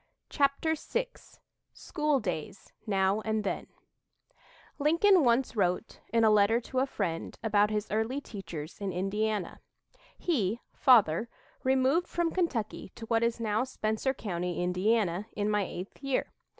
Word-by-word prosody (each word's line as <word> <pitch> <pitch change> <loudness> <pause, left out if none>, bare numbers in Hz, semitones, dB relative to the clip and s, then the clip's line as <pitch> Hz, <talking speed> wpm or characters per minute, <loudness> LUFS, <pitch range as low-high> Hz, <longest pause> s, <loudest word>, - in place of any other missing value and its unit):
CHAPTER 280 +3 +2
VI 485 +10 -2 0.6
SCHOOL 300 -4 0
DAYS 185 0 -5
NOW 195 +1 +2
AND 220 -1 -1
THEN 200 - -3 1.1
Lincoln 335 +5 +5
once 240 0 +2
wrote, 185 +1 0
in 230 0 +3
a 220 - +6
letter 210 +2 +4
to 255 +2 -3
a 265 - +2
friend, 165 -10 -3
about 210 -1 +3
his 210 -1 -1
early 220 +6 0
teachers 175 - -8
in 200 -1 -2
Indiana: 200 +2 -2 0.6
"He 235 - 0
(father) 225 - +4 0.3
removed 265 +6 +2
from 345 -1 0
Kentucky 255 - -2
to 230 - -8
what 225 0 +1
is 235 0 0
now 220 0 +1
Spencer 255 +1 -1
County, 180 -4 -3
Indiana, 190 +1 +1
in 210 0 0
my 210 -2 +1
eighth 185 +7 -8
year. 275 -2 -1
220 Hz, 135 wpm, -30 LUFS, 195-265 Hz, 1.1 s, a